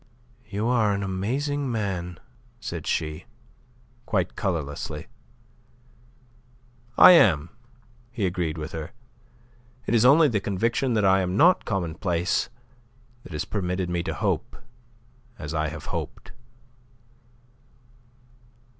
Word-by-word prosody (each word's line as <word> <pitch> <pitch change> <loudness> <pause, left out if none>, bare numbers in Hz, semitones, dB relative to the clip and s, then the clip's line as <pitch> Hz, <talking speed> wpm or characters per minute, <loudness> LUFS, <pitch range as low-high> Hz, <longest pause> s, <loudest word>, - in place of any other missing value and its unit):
"You 105 +1 -2
are 115 -4 +3
an 100 0 -2
amazing 130 +9 -2
man," 90 -6 -3 0.4
said 85 -8 -6
she, 75 -1 -2 0.8
quite 95 -4 0
colourlessly. 75 -4 -3 1.9
"I - - +10
am," 85 - +5 0.6
he 115 -4 -2
agreed 85 -3 -2
with 75 +2 -5
her. 80 0 -6 0.9
"It - - -1
is 115 -1 +4
only 150 +5 +7
the 110 -6 0
conviction 115 +6 0
that 105 -2 +2
I 95 0 +5
am 90 +1 -1
not 180 +6 +5
commonplace 90 -2 -1 0.7
that 85 - -12
has 75 - -3
permitted 90 -3 -2
me 85 -1 0
to - - -4
hope - - -1 0.8
as 75 +1 -6
I 80 -1 0
have 75 +1 -7
hoped." - - -5
95 Hz, 110 wpm, -25 LUFS, 85-110 Hz, 1.9 s, I